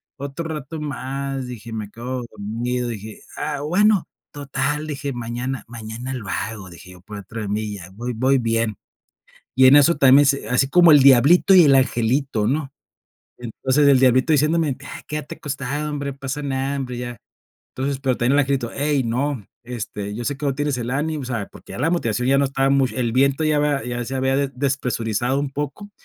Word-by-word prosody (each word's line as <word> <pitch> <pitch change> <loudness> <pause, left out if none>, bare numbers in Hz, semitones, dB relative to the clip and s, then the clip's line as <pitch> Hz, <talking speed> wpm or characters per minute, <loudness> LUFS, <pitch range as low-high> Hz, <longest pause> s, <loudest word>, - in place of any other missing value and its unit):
otro 140 +4 -6
rato 155 0 -6
más, 135 -2 -4
dije, 115 -2 -8
me 105 -2 -5
quedo 125 +3 -5
dormido, 120 +4 -3
dije, 110 -1 -8
ah, - - -3
bueno, 195 +5 +2 0.2
total, 145 +1 -2
dije, 145 -2 -4
mañana 120 +2 -4
mañana 115 +2 -7
lo 120 -6 -6
hago, 100 +1 -4
dije 85 +2 -13
yo 90 -1 -15
por 105 +3 -10
dentro 110 +3 -7
de 105 - -4
mí, 105 +1 -2
ya 90 -3 -9
voy 120 +5 -5
voy 130 +4 +2
bien. 115 -2 0 0.8
Y 130 +1 +6
en 135 +2 +8
eso 150 +4 +5
también 140 0 +6
se 140 0 +1
así 130 +2 +2
como 175 +2 +6
el 145 - +8
diablito 140 +9 +6
y 180 -2 +8
el 140 -2 +5
angelito, 130 -2 +1
¿no? 140 +3 -1 0.7
Entonces, 130 +4 0
el 140 -2 +5
diablito 130 +4 +4
diciéndome: 150 0 +2 0.3
"Quédate 150 -1 -5
acostado, 145 +1 -4
hombre, 145 -1 -3
no - - -15
pasa 135 +1 -4
nada, 135 0 -2
hombre", 125 -2 -4
ya. 120 -1 -6 0.5
Entonces, 135 +1 -2
pero 130 -2 0
también 120 +2 +2
el - - +4
angelito: 135 -4 -1
"hey, 145 -1 +1
no, 125 0 -2 0.2
este, 105 -4 -5
yo 120 +2 -5
sé 140 +4 -2
que 140 - -7
hoy 135 - 0
tienes 145 -1 -1
el 120 0 -3
ánimo, 150 +2 -2
o - - -5
sea, 120 -5 -4
porque - - -14
ya - - -7
la 145 +6 +1
motivación 125 -7 0
ya 135 - +4
no 140 - +3
estaba 135 0 0
mucho, 135 -2 +2
el 120 -2 0
viento 135 +4 +2
ya 155 -1 +2
había 145 -1 +1
ya 120 0 -3
se 135 - -5
había 130 0 +1
despresurizado 125 -2 -1
un 140 -1 -3
poco", 145 +9 -5
130 Hz, 200 wpm, -21 LUFS, 120-145 Hz, 0.8 s, en